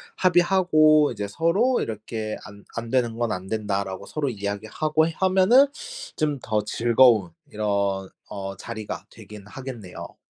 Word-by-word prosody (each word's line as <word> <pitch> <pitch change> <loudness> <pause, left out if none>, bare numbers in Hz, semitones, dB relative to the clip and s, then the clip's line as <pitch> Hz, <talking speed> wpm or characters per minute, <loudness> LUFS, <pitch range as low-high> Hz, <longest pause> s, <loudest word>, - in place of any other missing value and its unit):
합의하고 175 -5 +4
이제 105 -3 -4
서로 180 - +1
이렇게 110 0 -4
"안 100 0 -13
안 115 0 -4
되는 120 -2 0
건 120 -2 0
안 90 +1 -6
된다."라고 100 -3 -2
서로 145 +3 -2
이야기하고 110 +9 -1
하면은 190 - +4 0.5
좀 150 -3 -1
더 105 -1 -1
즐거운 115 -3 +4 0.2
이런 100 -2 -1 0.2
어 95 -1 -6
자리가 110 -2 -6
되긴 105 -2 -12
하겠네요. 120 -5 -8
115 Hz, 280 characters per minute, -24 LUFS, 100-155 Hz, 0.5 s, 합의하고